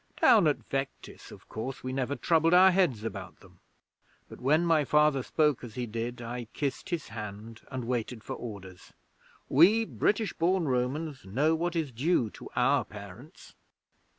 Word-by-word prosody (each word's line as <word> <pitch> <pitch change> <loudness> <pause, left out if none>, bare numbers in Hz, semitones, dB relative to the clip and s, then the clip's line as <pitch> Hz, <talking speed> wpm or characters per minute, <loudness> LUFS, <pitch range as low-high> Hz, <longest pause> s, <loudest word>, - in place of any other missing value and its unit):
Down - - +6
at - - -1
Vectis, - - -5
of - - -14
course, 125 +4 -6
we 130 0 -4
never 135 +1 -1
troubled 165 +5 +3
our 190 +1 +8
heads 170 - +1
about 95 -5 -6
them. - - -19 0.7
But - - -12
when 155 +6 +3
my 165 -3 +3
Father 150 -1 +3
spoke 150 0 +1
as 115 -3 -9
he 125 -1 -2
did, 120 +2 -5
I 120 +1 -5
kissed 140 -3 -3
his 170 -4 -3
hand, 110 +1 -8
and 130 -3 -5
waited 120 -1 -3
for - - -5
orders. 95 -6 -9 0.5
We 200 +11 +5
British 215 -1 0
born 175 0 +1
Romans 135 +3 -2
know 135 +12 +1
what 170 +2 -1
is 160 -5 -1
due 125 -2 +1
to - - -11
our - - +3
parents.' 105 - -12
130 Hz, 165 wpm, -29 LUFS, 115-160 Hz, 0.7 s, our